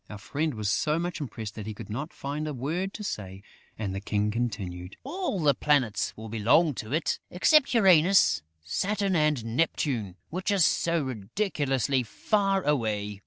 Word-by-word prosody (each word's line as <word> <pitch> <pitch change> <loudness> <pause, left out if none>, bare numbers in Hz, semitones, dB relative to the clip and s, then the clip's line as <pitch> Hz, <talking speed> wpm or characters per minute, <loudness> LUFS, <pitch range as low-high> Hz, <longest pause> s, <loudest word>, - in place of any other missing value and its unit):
Our 105 - -7
friend 140 +9 -2
was 105 -2 -1
so 150 +6 +1
much 175 -1 -3
impressed 110 -5 -6
that 105 -1 -7
he 110 - -5
could - - -9
not 140 +9 -4
find 145 +2 -4
a 150 - -4
word 165 +10 -2
to 210 - -6
say; 95 - -5 0.3
and 100 -3 -3
the 95 - -3
King 105 0 0
continued: 100 -6 -4
"All 320 - -2
the 150 -3 +4
Planets 130 -9 +1
will 110 +1 -7
belong 120 +9 +3
to 110 +1 -11
it, 160 +4 0
except 260 - +4
Uranus, 190 - +5 0.2
Saturn 195 - 0
and 150 -7 +2
Neptune, 125 - 0 0.2
which 185 +5 -2
are 200 - +2
too 170 -2 +2
ridiculously 135 - -1
far 195 - 0
away." 105 -8 -1
140 Hz, 165 wpm, -27 LUFS, 105-170 Hz, 0.3 s, Uranus